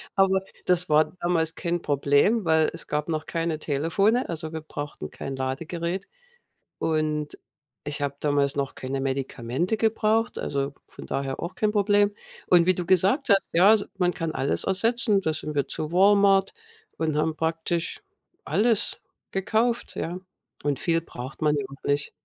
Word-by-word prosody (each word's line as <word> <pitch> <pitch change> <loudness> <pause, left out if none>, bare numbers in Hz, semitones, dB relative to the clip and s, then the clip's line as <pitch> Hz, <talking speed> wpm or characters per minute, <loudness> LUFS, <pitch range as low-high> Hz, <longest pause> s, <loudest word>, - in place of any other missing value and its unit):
Aber 190 -1 +4 0.3
das 180 -1 +2
war 155 +1 +3
damals 165 -2 +1
kein 170 0 -2
Problem, 145 - +2
weil 160 -1 +4
es - - -7
gab 150 0 -2
noch 155 -1 -2
keine 165 -2 -2
Telefone, 165 - +1
also 160 -1 -5
wir 160 - -4
brauchten 145 - -7
kein 135 - -6
Ladegerät. 165 +8 -3 0.7
Und 155 -1 -1 0.5
ich 145 0 -2
habe 140 -1 -2
damals 145 -1 +1
noch 140 -1 -2
keine 135 +1 -4
Medikamente 135 - -2
gebraucht, 225 +1 +1
also 140 0 -2
von - - -12
daher 135 -1 -3
auch 170 +2 -5
kein 215 -1 0
Problem. 205 0 +3 0.3
Und 175 -2 +5
wie 185 - +4
du 180 -1 -4
gesagt 195 - +3
hast, 200 -3 +3
ja, 190 +6 +7
s 210 - -1
man 180 -1 +2
kann 165 -2 -3
alles 140 - 0
ersetzen. 215 +1 +2
Da 160 -4 -1
sind 150 0 -4
wir 140 -1 0
zu 155 +1 -3
Walmart 195 0 +4 0.4
und 155 -2 -1
haben 155 +1 0
praktisch 165 +1 -2 0.4
alles 210 +6 +2 0.3
gekauft, 220 +5 0
ja. 175 +2 -3 0.4
Und 145 -2 0
viel 165 -2 +2
braucht 130 -1 -9
man 150 -1 +3
ja 140 - -2
auch 135 0 -14
nicht. 145 +1 +1
165 Hz, 160 wpm, -25 LUFS, 145-195 Hz, 0.7 s, ja